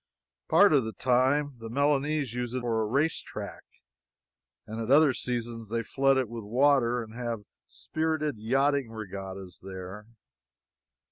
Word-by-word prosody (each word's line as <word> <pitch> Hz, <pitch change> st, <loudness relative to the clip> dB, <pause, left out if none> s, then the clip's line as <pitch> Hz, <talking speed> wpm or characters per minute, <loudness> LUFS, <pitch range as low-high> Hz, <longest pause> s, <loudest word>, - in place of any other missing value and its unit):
Part -, -, +6 dB
of 140 Hz, -4 st, +4 dB
the 110 Hz, 0 st, -5 dB
time, 130 Hz, +2 st, +2 dB
the 115 Hz, 0 st, -7 dB
Milanese 140 Hz, 0 st, +1 dB
use 125 Hz, 0 st, -3 dB
it 130 Hz, -, -1 dB
for 115 Hz, -2 st, 0 dB
a 110 Hz, -, 0 dB
race 145 Hz, +8 st, +1 dB
track, -, -, -7 dB, 1.0 s
and 110 Hz, +1 st, -5 dB
at 115 Hz, -, -4 dB
other 145 Hz, 0 st, +6 dB
seasons 120 Hz, -3 st, -4 dB
they 115 Hz, +1 st, -1 dB
flood 135 Hz, +4 st, +2 dB
it 130 Hz, -2 st, +1 dB
with 115 Hz, 0 st, -7 dB
water 125 Hz, +1 st, +3 dB
and 110 Hz, 0 st, -12 dB
have 115 Hz, -3 st, -4 dB, 0.2 s
spirited 155 Hz, -5 st, -2 dB
yachting 135 Hz, +3 st, +1 dB
regattas 95 Hz, -4 st, -7 dB
there. 95 Hz, +2 st, -8 dB
120 Hz, 145 wpm, -28 LUFS, 110-140 Hz, 1.0 s, Part